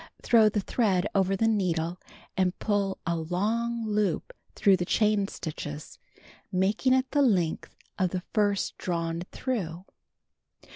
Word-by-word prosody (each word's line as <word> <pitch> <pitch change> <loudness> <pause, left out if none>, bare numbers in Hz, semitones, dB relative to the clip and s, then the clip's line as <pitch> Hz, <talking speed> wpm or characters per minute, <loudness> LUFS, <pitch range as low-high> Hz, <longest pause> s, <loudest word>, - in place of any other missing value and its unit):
Throw 225 -3 +5
the 210 -1 -1
thread 195 -4 +1
over 195 -1 +2
the 225 +3 +2
needle 180 -5 0 0.4
and 185 -2 +1
pull 200 -2 0
a 170 -2 0
long 220 +8 -1
loop 210 - -1 0.2
tlirough 200 -2 +5
the - - +1
chain 210 0 +2
stitches, 150 -4 -7 0.5
making 200 +8 +2
it 260 0 +1
the 290 - +3
length 185 - +1 0.2
of 185 -1 +2
the 180 0 -4
first 205 -2 +1
drawn 170 -1 -2
tlirough. 185 -9 -3
195 Hz, 135 wpm, -28 LUFS, 180-220 Hz, 0.5 s, Throw